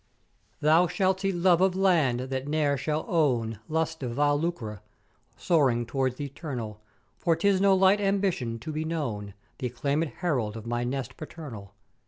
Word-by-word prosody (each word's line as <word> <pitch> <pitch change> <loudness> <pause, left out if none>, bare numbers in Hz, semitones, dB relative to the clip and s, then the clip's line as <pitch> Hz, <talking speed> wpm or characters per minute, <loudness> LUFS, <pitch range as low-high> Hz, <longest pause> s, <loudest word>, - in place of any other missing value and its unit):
Thou 160 +4 +5
shalt 190 +1 +1
see 195 0 0
Love 175 -1 +3
of 190 -1 +3
Land 165 -11 +3
that 130 +1 -4
ne'er 145 -1 +1
shall 150 +3 -2
own 120 - +1
lust 160 0 -1
of 125 -3 -3
vile 145 +3 +2
lucre; 115 - -3 0.6
soaring 130 -8 +2
towards 130 +1 -1
th' - - -8
Eternal: 130 -7 -6 0.4
For 170 -2 +2
'tis 190 +3 +2
no 195 -1 +5
light 190 +2 +4
ambition 195 - 0
to 155 - -5
be 155 +1 -2
known 115 - -3 0.2
th' 130 - -3
acclaimed 140 +6 0 0.2
herald 125 - 0
of 110 - -9
my 120 +1 -1
nest 130 +1 -4
paternal. 120 - -9
145 Hz, 165 wpm, -27 LUFS, 120-170 Hz, 0.6 s, Thou